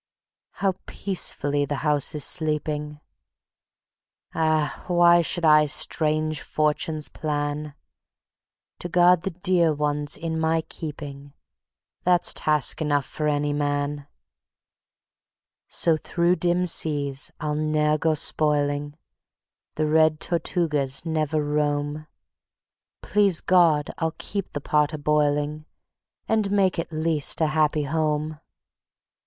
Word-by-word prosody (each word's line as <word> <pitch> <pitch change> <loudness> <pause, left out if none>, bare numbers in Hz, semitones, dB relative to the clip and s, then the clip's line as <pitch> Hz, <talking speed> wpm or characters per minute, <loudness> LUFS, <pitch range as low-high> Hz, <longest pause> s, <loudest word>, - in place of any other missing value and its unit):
How 195 -1 0
peacefully 145 -7 -1
the 145 +1 -2
house 150 -1 +1
is 150 - -3
sleeping! 150 -2 -2 1.3
Ah! 155 -2 0
why 175 -1 +5
should 170 +1 -1
I 150 -1 +6
strange 155 +1 -1
fortunes 155 0 -1
plan? 145 -1 -3 1.0
To 175 - -5
guard 175 0 +4
the 195 - -2
dear 175 -3 +2
ones 145 0 -1
in 160 -1 -3
my 160 0 +1
keeping 145 -3 -8 0.7
That's 175 -1 +3
task 150 0 +1
enough 145 -3 +1
for 150 - -3
any 145 0 0
man. 145 0 -2 1.6
So 165 -2 +2
through 175 +3 0
dim 175 +1 +1
seas 145 -5 -1
I'll 150 -1 -2
ne'er 155 0 +1
go 160 0 +1
spoiling; 145 -1 0 0.8
The 155 - 0
red 155 0 +3
Tortugas 155 -5 -1
never 155 -1 0
roam; 145 0 -1 1.0
Please 200 -5 +2
God! 165 -5 +3
I'll 160 -1 -1
keep 200 -2 -5
the 145 - -4
pot 150 +2 +1
a - - -3
boiling, 150 0 0 0.6
And 220 -2 +1
make 195 -3 +2
at 165 - -4
least 155 -2 0
a 160 - +3
happy 155 0 +1
home. 155 0 -1
155 Hz, 115 wpm, -24 LUFS, 145-165 Hz, 1.6 s, I